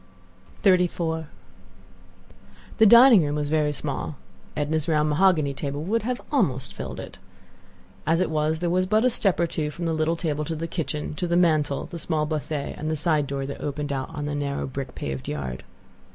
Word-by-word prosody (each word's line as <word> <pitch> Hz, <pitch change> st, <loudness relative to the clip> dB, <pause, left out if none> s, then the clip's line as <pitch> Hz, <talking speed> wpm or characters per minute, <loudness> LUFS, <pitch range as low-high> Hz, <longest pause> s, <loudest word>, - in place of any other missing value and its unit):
XXXIV 175 Hz, -4 st, +2 dB, 1.5 s
The 220 Hz, -, +7 dB
dining 235 Hz, -3 st, +8 dB
room 145 Hz, 0 st, -1 dB
was 145 Hz, -1 st, -2 dB
very 150 Hz, -1 st, +2 dB
small. 145 Hz, +1 st, -4 dB, 0.4 s
Edna's 150 Hz, +1 st, 0 dB
round 155 Hz, -2 st, +2 dB
mahogany 155 Hz, -3 st, +3 dB
would 155 Hz, +11 st, -1 dB
have 250 Hz, +3 st, -2 dB
almost 145 Hz, -, +1 dB
filled -, -, -6 dB
it. -, -, -9 dB, 0.9 s
As 165 Hz, +1 st, +3 dB
it 180 Hz, -3 st, 0 dB
was 155 Hz, +1 st, 0 dB
there 175 Hz, -1 st, 0 dB
was 185 Hz, +1 st, +1 dB
but 215 Hz, +4 st, +3 dB
a 255 Hz, -, +4 dB
step 195 Hz, -6 st, +2 dB
or 170 Hz, -, +3 dB
two 155 Hz, -2 st, -2 dB
from 170 Hz, +3 st, -5 dB
the 165 Hz, -, 0 dB
little 160 Hz, +1 st, +1 dB
table 155 Hz, -3 st, -2 dB
to 160 Hz, -, -3 dB
the 160 Hz, +1 st, -4 dB
kitchen, 150 Hz, -2 st, -3 dB
to 180 Hz, -, -1 dB
the 170 Hz, 0 st, +2 dB
mantel, 155 Hz, -5 st, +2 dB
the 170 Hz, -, -8 dB
small 155 Hz, -2 st, 0 dB
buffet, 150 Hz, -1 st, -3 dB
and 155 Hz, -, -3 dB
the 160 Hz, -, 0 dB
side 155 Hz, -2 st, +1 dB
door 135 Hz, 0 st, -3 dB
that 140 Hz, -, -7 dB
opened 145 Hz, 0 st, -3 dB
out 130 Hz, -1 st, -3 dB
on 150 Hz, -3 st, -5 dB
the 145 Hz, -, -3 dB
narrow 140 Hz, -1 st, -2 dB
brick 135 Hz, -1 st, -6 dB
paved 65 Hz, -1 st, -5 dB
yard. 65 Hz, -3 st, -4 dB
155 Hz, 190 wpm, -25 LUFS, 145-170 Hz, 1.5 s, dining